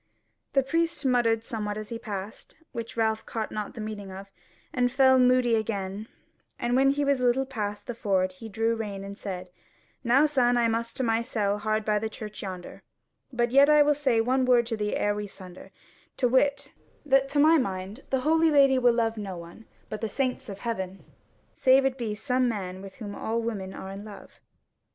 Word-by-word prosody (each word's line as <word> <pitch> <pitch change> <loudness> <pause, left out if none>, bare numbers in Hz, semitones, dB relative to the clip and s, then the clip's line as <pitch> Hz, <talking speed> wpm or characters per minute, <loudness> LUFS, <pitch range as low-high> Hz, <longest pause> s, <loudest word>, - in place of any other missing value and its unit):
The 275 - +3
priest 330 +2 0
muttered 235 -3 +2
somewhat 210 -2 -4
as 215 -1 -6
he 230 - -5
passed, 205 -3 -7 0.2
which 230 -1 -6
Ralph 220 -1 +1
caught 220 -2 -4
not 210 -1 -5
the 225 - -6
meaning 210 -2 -6
of, 195 +1 -10 0.4
and 245 -1 +1
fell 260 0 +5
moody 250 -1 +4
again; 205 -2 -2 0.5
and 240 +1 0
when 270 +1 +5
he 285 +1 +1
was 280 -2 +2
a - - -1
little 255 +2 +2
past 210 -6 -4
the 240 - -4
ford 190 -4 0
he 220 +4 -10
drew 225 +2 0
rein 205 -3 -5
and 200 0 -7
said: 185 -3 -6 0.5
"Now, 260 +5 +4
son, 250 -5 +2
I 235 -1 +3
must 230 0 -2
to 260 - 0
my 225 -1 +1
cell 210 -4 -1
hard 215 0 -1
by 210 -1 +2
the 220 +1 -3
church 210 -1 -8
yonder: 185 -2 -7 0.5
but 240 -1 0
yet 275 +3 +6
I 300 -1 +7
will 295 0 +3
say 270 -5 +1
one 255 +3 +2
word 245 -2 +4
to 230 0 -2
thee 210 -1 -2
ere 205 - +1
we 210 0 -4
sunder; 185 -2 -12 0.5
to 250 - +2
wit, 280 +3 +1 0.3
that 270 -1 +3
to 290 - 0
my 315 +2 +6
mind 195 -1 -4
the 265 -1 0
Holy 320 +3 +3
Lady 275 -3 +5
will 245 -2 +4
love 225 -1 0
no 195 -4 -5
one 170 +6 -12 0.2
but 215 - -6
the 225 - -2
saints 260 -1 -2
of 200 - -8
heaven, 190 -5 -4 0.5
save 265 +1 +4
it 265 -1 +1
be 220 -3 -2
some 250 +3 +1
man 190 -4 -4
with 195 -1 -10
whom 205 -4 -7
all 225 +2 -2
women 210 -5 -4
are 190 0 -8
in 195 +1 -8
love." 210 -2 -12
230 Hz, 205 wpm, -27 LUFS, 205-255 Hz, 0.5 s, I